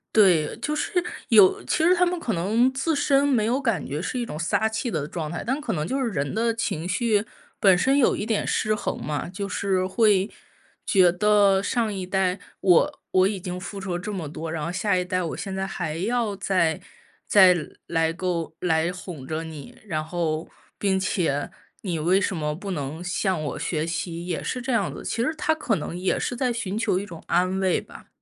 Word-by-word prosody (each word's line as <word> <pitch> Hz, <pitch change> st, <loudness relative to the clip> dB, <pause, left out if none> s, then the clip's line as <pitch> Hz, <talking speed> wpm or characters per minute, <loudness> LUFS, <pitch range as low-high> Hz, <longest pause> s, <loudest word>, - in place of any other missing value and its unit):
对， 180 Hz, -8 st, +4 dB
就 300 Hz, -, -1 dB
是 -, -, -2 dB, 0.4 s
有 205 Hz, -5 st, +6 dB
其 -, -, 0 dB
实 350 Hz, +3 st, +6 dB
他 360 Hz, 0 st, +3 dB
们 355 Hz, 0 st, -1 dB
可 235 Hz, -9 st, -2 dB
能 215 Hz, +9 st, +2 dB
自 285 Hz, +5 st, 0 dB
身 280 Hz, 0 st, +3 dB
没 245 Hz, -7 st, +2 dB
有 250 Hz, +5 st, +1 dB
感 230 Hz, -, 0 dB
觉 145 Hz, +3 st, -3 dB
是 250 Hz, +7 st, -3 dB
一 240 Hz, -, -1 dB
种 150 Hz, -, -6 dB
撒 170 Hz, +6 st, +1 dB
气 220 Hz, +3 st, -2 dB
的 155 Hz, -7 st, -2 dB
状 155 Hz, -1 st, -4 dB
态， 170 Hz, -, -4 dB
但 265 Hz, +4 st, 0 dB
可 300 Hz, -, -2 dB
能 155 Hz, -3 st, -1 dB
就 265 Hz, +11 st, -1 dB
是 255 Hz, -3 st, 0 dB
人 140 Hz, -8 st, -2 dB
的 230 Hz, +2 st, +1 dB
情 175 Hz, -7 st, -2 dB
绪 210 Hz, +2 st, +1 dB, 0.3 s
本 190 Hz, -3 st, +6 dB
身 270 Hz, +8 st, +3 dB
有 275 Hz, -, +4 dB
一 205 Hz, -, -3 dB
点 220 Hz, -2 st, 0 dB
失 215 Hz, -, +1 dB
衡 210 Hz, -, -3 dB
嘛。 150 Hz, +2 st, -3 dB
就 200 Hz, +2 st, -4 dB
是 190 Hz, -1 st, 0 dB
会 200 Hz, 0 st, +3 dB, 0.6 s
觉 185 Hz, -3 st, +5 dB
得 200 Hz, +1 st, +4 dB
上 225 Hz, +1 st, 0 dB
一 190 Hz, -2 st, -4 dB
代 190 Hz, 0 st, 0 dB, 0.2 s
我 195 Hz, -, +4 dB
我 185 Hz, 0 st, +4 dB
已 200 Hz, -1 st, -2 dB
经 180 Hz, 0 st, -5 dB
付 195 Hz, +2 st, -7 dB
出 190 Hz, -2 st, -4 dB
了 175 Hz, -, -2 dB
这 210 Hz, +4 st, -5 dB
么 180 Hz, -6 st, -4 dB
多， 160 Hz, +2 st, -6 dB
然 160 Hz, -2 st, -3 dB
后 170 Hz, -, -2 dB
下 185 Hz, +2 st, +1 dB
一 180 Hz, 0 st, 0 dB
代 185 Hz, 0 st, -1 dB
我 165 Hz, -3 st, -3 dB
现 195 Hz, -1 st, -5 dB
在 190 Hz, 0 st, -2 dB
还 170 Hz, -5 st, -3 dB
要 220 Hz, +2 st, 0 dB
再 185 Hz, -5 st, +1 dB, 0.5 s
再 185 Hz, -3 st, +7 dB, 0.3 s
来 165 Hz, -1 st, +1 dB
够 170 Hz, -2 st, -3 dB
来 165 Hz, -1 st, +1 dB
哄 180 Hz, -7 st, -8 dB
着 160 Hz, +1 st, -3 dB
你， 155 Hz, -4 st, -9 dB
然 155 Hz, -6 st, -2 dB
后 160 Hz, -1 st, -2 dB, 0.3 s
并 195 Hz, -2 st, +1 dB
且 170 Hz, -6 st, -1 dB, 0.3 s
你 175 Hz, -5 st, -2 dB
为 180 Hz, +5 st, +3 dB
什 195 Hz, -, -1 dB
么 150 Hz, -2 st, -2 dB
不 195 Hz, +4 st, -6 dB
能 150 Hz, 0 st, -4 dB
向 180 Hz, -2 st, -1 dB
我 145 Hz, -, -4 dB
学 155 Hz, -2 st, -1 dB
习， 170 Hz, 0 st, -4 dB
也 175 Hz, -3 st, -2 dB
是 250 Hz, -, -3 dB
这 260 Hz, +1 st, -3 dB
样 215 Hz, -6 st, +1 dB
子， -, -, -8 dB
其 -, -, -2 dB
实 310 Hz, +7 st, 0 dB
他 320 Hz, -1 st, +2 dB
可 280 Hz, -8 st, 0 dB
能 165 Hz, +1 st, -5 dB
也 185 Hz, +1 st, 0 dB
是 245 Hz, -, -2 dB
在 250 Hz, 0 st, 0 dB
寻 220 Hz, -5 st, -3 dB
求 225 Hz, -5 st, +1 dB
一 195 Hz, -, -3 dB
种 170 Hz, -5 st, -10 dB
安 185 Hz, +2 st, +1 dB
慰 190 Hz, -2 st, +2 dB
吧。 -, -, -13 dB
190 Hz, 235 characters per minute, -25 LUFS, 170-220 Hz, 0.6 s, 再